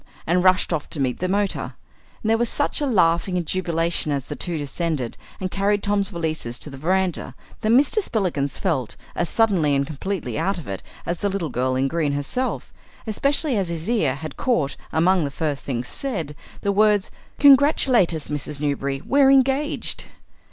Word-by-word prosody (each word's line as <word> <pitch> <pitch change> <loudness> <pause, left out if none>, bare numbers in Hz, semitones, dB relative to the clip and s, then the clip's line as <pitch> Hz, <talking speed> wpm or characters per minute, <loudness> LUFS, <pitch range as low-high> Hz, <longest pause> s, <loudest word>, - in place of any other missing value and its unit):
and 175 +2 +2
rushed 185 -1 +3
off 155 -3 -3
to 150 - -4
meet 130 -2 0
the 185 - -1
motor. 200 +1 -1 0.5
And 220 - +1
there 225 - +4
was 240 -1 +1
such 290 - 0
a 290 - +1
laughing 180 -4 +2
and 175 - -2
jubilation 170 -3 -1
as 140 -2 -1
the 145 - -6
two 170 +1 -3
descended 145 -3 -2 0.2
and 185 -1 -3
carried 200 +1 +1
Tom's 200 -1 +1
valises 160 - -3
to 150 - -6
the 135 - -9
verandah, 185 +3 -1 0.2
that 215 - -1
Mr. 285 - +4
Spillikins 175 - -1
felt 145 - -1 0.2
as 175 - -1
suddenly 185 -11 +3
and 140 0 +1
completely 155 - -4
out 195 0 0
of 170 - -8
it 95 -1 -4 0.2
as 170 0 -2
the 205 - 0
Little 190 -5 -2
Girl 130 +1 0
in 130 +1 +1
Green 150 -1 0
herself 145 - -2 0.3
especially 275 +5 +2
as 195 -4 0
his 165 -1 -3
ear 185 - +1
had 155 0 -8
caught, 230 - 0 0.2
among 175 +2 +3
the 145 - -1
first 145 0 -3
things 125 -2 -3
said, 170 - -3 0.3
the 200 - +1
words, 210 -1 +3 0.3
"Congratulate 275 - +5
us, 160 -3 -4
Mrs. 150 0 -3
Newberry, 140 -2 -1
we're 275 -1 +4
engaged." 275 +2 +2
175 Hz, 185 wpm, -23 LUFS, 145-205 Hz, 0.5 s, Congratulate